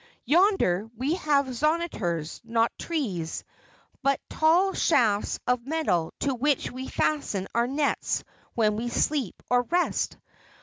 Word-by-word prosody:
"Yonder, 300 Hz, -, +3 dB
we 270 Hz, +7 st, 0 dB
have 295 Hz, -5 st, +2 dB
zonitors; 250 Hz, -, -1 dB
not 230 Hz, 0 st, +1 dB
trees, 200 Hz, -, -3 dB, 0.6 s
but 275 Hz, -1 st, +2 dB
tall 350 Hz, +5 st, +3 dB
shafts 225 Hz, -10 st, +2 dB
of 250 Hz, 0 st, 0 dB
metal 280 Hz, -, 0 dB
to 275 Hz, -, 0 dB
which 275 Hz, +2 st, 0 dB
we 260 Hz, +1 st, -6 dB
fasten 210 Hz, -11 st, -1 dB
our 235 Hz, +1 st, +2 dB
nets 285 Hz, +2 st, 0 dB, 0.3 s
when 215 Hz, -2 st, +2 dB
we 240 Hz, +2 st, -2 dB
sleep 265 Hz, -, -1 dB
or 245 Hz, 0 st, +5 dB
rest. 355 Hz, +1 st, 0 dB
260 Hz, 125 wpm, -26 LUFS, 220-310 Hz, 0.6 s, or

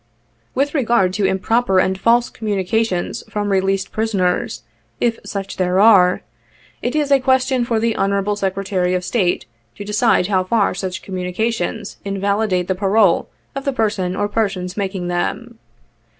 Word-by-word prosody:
" 115 Hz, 0 st, -41 dB
With 280 Hz, +2 st, 0 dB
regard 235 Hz, -, +2 dB
to 195 Hz, 0 st, +1 dB
improper 195 Hz, +2 st, +1 dB
and 185 Hz, +1 st, +3 dB
false 235 Hz, +5 st, +2 dB
communications 205 Hz, -2 st, -1 dB
from 205 Hz, -1 st, -2 dB
released 195 Hz, 0 st, 0 dB
prisoners, 195 Hz, -, -1 dB, 0.4 s
if 230 Hz, -1 st, 0 dB
such 195 Hz, -1 st, -5 dB
there 185 Hz, 0 st, +1 dB
are, 195 Hz, -4 st, +5 dB, 0.6 s
it 245 Hz, -, -2 dB
is 295 Hz, -2 st, 0 dB
a 275 Hz, -, +6 dB
question 260 Hz, -1 st, +2 dB
for 230 Hz, -2 st, 0 dB
the 230 Hz, 0 st, 0 dB
Honorable 200 Hz, +1 st, 0 dB
Secretary 190 Hz, -2 st, -1 dB
of 180 Hz, -, -2 dB
State 180 Hz, -3 st, 0 dB, 0.3 s
to 205 Hz, -, -8 dB
decide 210 Hz, -1 st, +2 dB
how 190 Hz, -1 st, +1 dB
far 205 Hz, +2 st, +1 dB
such 185 Hz, -1 st, -5 dB
communications 195 Hz, +3 st, -3 dB
invalidate 200 Hz, -1 st, 0 dB
the 190 Hz, -, +1 dB
parole 195 Hz, 0 st, +2 dB, 0.2 s
of 275 Hz, -, -5 dB
the 275 Hz, -, -1 dB
person 205 Hz, -6 st, -1 dB
or 205 Hz, -, 0 dB
persons 195 Hz, -4 st, -2 dB
making 190 Hz, -3 st, -3 dB
them. 230 Hz, +6 st, -3 dB
200 Hz, 150 wpm, -19 LUFS, 185-225 Hz, 0.6 s, a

